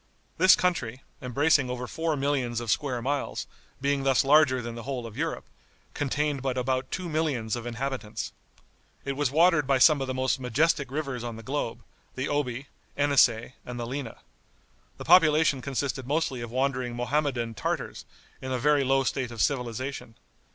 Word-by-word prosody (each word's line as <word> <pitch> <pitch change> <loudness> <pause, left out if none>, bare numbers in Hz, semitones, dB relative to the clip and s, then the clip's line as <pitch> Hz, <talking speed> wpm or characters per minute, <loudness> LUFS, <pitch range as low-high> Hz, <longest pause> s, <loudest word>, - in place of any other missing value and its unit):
This 185 +2 +8
country, 135 -9 -1 0.2
embracing 140 +2 +2
over 125 0 -3
four 160 +4 -2
millions 135 -4 0
of 120 -2 -2
square 130 -5 -1
miles, 140 +2 -2 0.3
being 140 0 0
thus 135 0 +3
larger 140 -2 +5
than 120 -1 -5
the 115 - -7
whole 125 0 -4
of 110 -2 -9
Europe, - - -3 0.5
contained 145 0 -1
but 130 -1 -2
about 130 +1 -1
two 185 -1 -4
millions 150 -9 -1
of 120 0 -6
inhabitants. 120 -3 -4 0.7
It 140 - -1
was 140 -1 0
watered 160 0 +4
by 135 -1 +3
some 145 +2 +6
of 135 - -2
the 130 - -3
most 130 +1 0
majestic 140 +3 +1
rivers 135 -4 -3
on 120 -1 -5
the 115 - -10
globe, 135 -3 -3 0.3
the 130 +2 -2
Oby, 135 -2 -2 0.3
Enisei 130 -5 +3
and 125 -1 -7
the 120 - -3
Lena. 130 -1 -5 0.8
The - - -8
population 155 -5 +5
consisted 135 -1 -3
mostly 145 -4 -1
of 120 - -5
wandering 130 -1 -1
Mohammedan 120 -2 -1
Tartars, 105 - -3 0.4
in 130 - -5
a 130 - 0
very 145 +2 +3
low 135 +1 +2
state 130 -1 -1
of 120 -1 -9
civilization. 125 -1 -2
130 Hz, 170 wpm, -27 LUFS, 120-145 Hz, 0.8 s, This